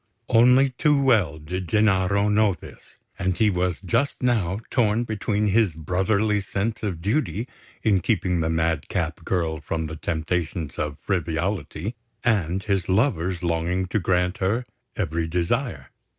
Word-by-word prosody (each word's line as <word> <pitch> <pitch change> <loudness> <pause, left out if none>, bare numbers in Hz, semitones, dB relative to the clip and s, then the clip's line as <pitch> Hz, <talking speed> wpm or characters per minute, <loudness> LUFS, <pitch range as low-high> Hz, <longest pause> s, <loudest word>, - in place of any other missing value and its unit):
Only 125 +4 +5
too 150 +3 +2
well 110 - +3
did 90 +4 -5
Gennaro 100 0 +2
know 105 -2 +3
this; - - -14 0.2
and 95 -1 0
he 110 -2 +3
was 90 -2 0
just 140 - +1
now 105 -6 +1
torn 115 -2 +2
between 105 -2 -1
his 105 -3 +3
brotherly 100 +6 +1
sense 100 +3 -2
of 90 -6 -3
duty 115 +1 0 0.4
in 105 -4 +3
keeping 90 -3 0
the 80 0 0
madcap 80 -2 -1
girl 80 -4 -1
from 80 +2 -3
the 80 0 -5
temptations 80 0 -3
of 75 -1 -2
frivolity, 90 - -2 0.3
and 95 -5 +1
his 100 -4 -1
lover's 95 - +1
longing 85 +2 0
to 110 - +1
grant 90 0 0
her 110 +6 0 0.3
every 85 -4 -1
desire. 85 +1 -2
95 Hz, 140 wpm, -24 LUFS, 85-110 Hz, 0.4 s, Only